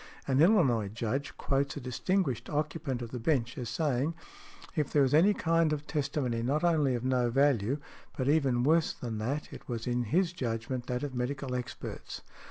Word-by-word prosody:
An 135 +1 +3
Illinois 150 - +4
Judge 115 +6 -3
quotes 140 +1 0
a - - -2
distinguished 135 - -1
occupant 145 -4 -2
of 115 - -7
the 125 - -4
bench 125 -2 0
as 120 -3 -4
saying, 145 +4 0 0.6
"if 150 -3 0
there 145 - +4
was 130 - +1
any 170 +7 +6
kind 165 -1 +2
of 150 -1 -2
testimony 135 -6 -1
not 140 +7 0
only 155 -7 +3
of 120 - -3
no 125 -2 +2
value, 135 -1 +2 0.4
but 130 - -1
even 135 -5 +3
worse 160 +3 +3
than 115 -3 -5
that, 135 +7 -3
it - - -11
was 115 -2 -3
in 120 0 0
his 175 - +1
judgment 120 -2 -3
that 125 +1 -2
of 145 -2 -3
medical 130 +1 -3
experts." 125 -1 -6
135 Hz, 180 wpm, -30 LUFS, 120-150 Hz, 0.6 s, any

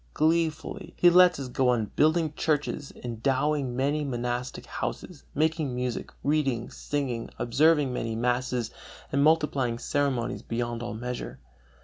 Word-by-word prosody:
Gleefully 160 +2 0
he 175 - +6
lets 180 -2 +6
us 135 - -4
go 125 0 +1
on 115 -4 +1
building 155 0 +3
churches, 150 -2 -1
endowing 130 +3 0
many 145 +4 +1
monastic 125 -1 -3
houses, 170 -6 -5
making 155 -3 +1
music, 125 -1 -3
reading, 135 -5 0
singing, 130 -5 -3
observing 145 +2 +3
many 115 -2 -2
masses, 125 0 0 0.4
and 140 +1 +2
multiplying 140 -6 +2
ceremonies 135 -2 -1
beyond 120 0 -3
all 120 -2 -4
measure. 120 - -5
135 Hz, 125 wpm, -27 LUFS, 120-150 Hz, 0.4 s, he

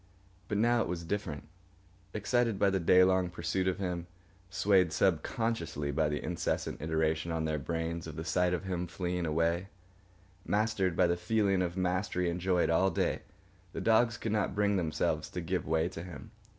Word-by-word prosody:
But 105 - -1
now 120 +2 +3
it - - -1
was 85 0 -3
different. 80 -5 -4 0.6
Excited 115 +1 +1
by 100 0 +3
the 95 - +1
day 90 +2 +6
long 95 -1 +3
pursuit 90 +2 -2
of 95 - +1
him, 90 -3 -3 0.4
swayed 90 0 +3
subconsciously 85 -4 0
by 75 +1 +1
the 75 -2 -3
insistent - - -2
iteration 80 +1 0
on 80 -1 -1
their 80 -1 -1
brains 80 +2 -3
of 80 - -7
the 80 - -5
sight 90 0 +2
of 90 +1 -1
him 90 -2 -3
fleeing 90 0 -2
away, 85 +4 +1 0.8
mastered 105 -4 +1
by - - +5
the 85 0 +2
feeling 100 +1 +1
of 90 0 -2
mastery 90 -1 0
enjoyed 90 0 +1
all 95 +4 +4
day, 85 - -1 0.5
the - - -4
dogs 115 0 +3
could 110 - -3
not 105 -3 0
bring 105 0 +2
themselves 85 -5 -1
to - - -5
give - - -2
way 80 +1 +2
to 80 - -7
him. 85 -4 -9
90 Hz, 175 wpm, -31 LUFS, 80-95 Hz, 0.8 s, day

